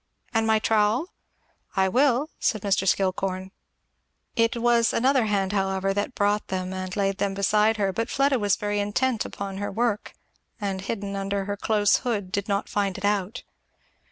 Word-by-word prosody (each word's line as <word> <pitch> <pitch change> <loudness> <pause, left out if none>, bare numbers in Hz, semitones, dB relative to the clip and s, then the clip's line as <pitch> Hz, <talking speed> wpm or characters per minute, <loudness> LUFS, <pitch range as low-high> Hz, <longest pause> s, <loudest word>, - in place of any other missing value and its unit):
and 225 -1 +2
my 220 0 +4
trowel?" 220 - +1 0.6
"I 190 -1 +3
will! 265 +6 +2
" - - -44
said 215 -3 0
Mr. 195 -1 +1
Skillcorn. 190 0 0 0.8
It 230 +1 +2
was 235 -1 +3
another 260 0 +3
hand 195 -2 0
however 195 -1 0
that 205 +5 -2
brought 205 +1 +1
them 185 0 -3
and 185 -1 -5
laid 195 -1 0
them 195 -1 0
beside 210 +2 +2
her; 195 -2 0
but 230 +5 -2
Fleda 275 -1 +2 0.2
very 205 0 -1
intent 220 +4 0
upon 195 -1 -6
her 205 +1 -3
work 225 0 -1 0.5
and 195 -3 -3
hidden 200 0 -4
under 195 0 -2
her 205 0 -2
close 205 0 +2
hood 205 -7 -3
did 200 0 -2
not 200 0 -1
find 200 -2 -1
it 195 - -4
out. 205 +2 -1
205 Hz, 170 wpm, -25 LUFS, 195-225 Hz, 0.8 s, my